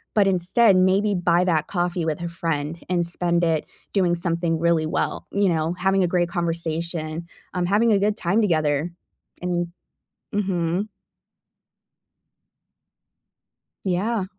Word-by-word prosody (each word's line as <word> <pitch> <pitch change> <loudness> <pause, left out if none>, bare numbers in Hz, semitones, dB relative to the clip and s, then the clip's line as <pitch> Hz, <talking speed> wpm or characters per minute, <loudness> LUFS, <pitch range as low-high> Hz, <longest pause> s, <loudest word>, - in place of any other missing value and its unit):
but 205 -2 +5
instead, 195 +3 +4
maybe 190 +3 +3
buy 175 0 +3
that 160 -4 +1
coffee 175 -2 -1
with 155 -2 -1
a 170 - -3
friend 165 -1 -3
and 175 -2 +1
spend 170 0 0
it 160 -2 +1 0.3
doing 180 -4 +2
something 170 -1 -1
really 165 -1 +2
well, - - -2
you 200 0 +2
know, 160 0 0
having 190 +1 +2
a - - +2
great 175 0 +1
conversation, 170 -1 -3 0.3
um, 180 -1 0
having 220 +4 +3
a 200 - +4
good 210 +2 +1
time 195 +6 +1
together. 155 -4 +1 0.5
And 175 -1 -1 0.7
Mhm. 190 -1 0 3.0
Yeah. 195 +3 0
175 Hz, 130 wpm, -23 LUFS, 165-190 Hz, 3.0 s, but